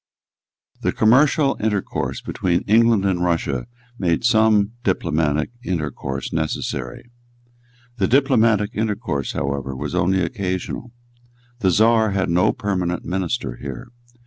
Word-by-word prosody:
The - - 0
commercial 135 +5 +3
intercourse 105 -2 -2
between 90 -2 -1
England 110 -1 +3
and 90 -3 +1
Russia 85 - -1 0.3
made 85 -1 0
some 110 -3 +4
diplomatic 80 -3 0
intercourse 70 - -4
necessary. 80 - -3 0.9
The 95 -3 +1
diplomatic 115 -5 +3
intercourse 105 - -2
however 70 -1 -3
was 75 +4 -5
only 90 +1 +2
occasional. 95 +6 -4 0.7
The 95 -5 +2
Czar 110 +2 +3
had 95 -3 0
no 90 +2 +3
permanent 90 -4 -2
minister 90 - -2
here. 70 - -7
95 Hz, 110 wpm, -21 LUFS, 80-110 Hz, 0.9 s, some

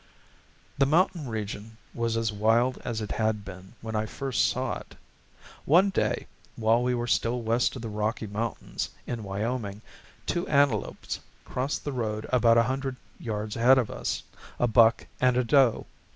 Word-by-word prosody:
The 135 - +5
mountain 165 -1 +2
region 110 0 -5 0.2
was 115 -1 -1
as 115 -1 0
wild 115 +5 +2
as 115 -2 -3
it 105 - -4
had 110 -2 0
been 95 +1 -10
when 110 0 -5
I 110 0 0
first 130 -5 0
saw - - -1
it. - - -14 0.7
One 185 +7 +5
day, - - 0 0.3
while 115 +1 +3
we 125 0 +1
were 120 0 -1
still 120 0 +1
west 115 +4 +1
of 125 - -7
the - - -3
Rocky 105 +2 -2
Mountains, 110 +2 -3 0.2
in 120 -2 -4
Wyoming, 105 +1 -3 0.4
two 175 - -1
antelopes 140 -7 +1 0.3
crossed 130 +3 -2
the 145 - -1
road 110 -3 -2
about 115 -2 +5
a 115 - +6
hundred 130 +2 -2 0.2
yards 105 -2 -3
ahead 125 +3 +6
of 125 -4 +1
us, - - -3 0.3
a - - +2
buck 115 0 +5
and 125 -1 +3
a 125 - +3
doe. 130 -1 +4
115 Hz, 165 wpm, -27 LUFS, 110-125 Hz, 0.7 s, a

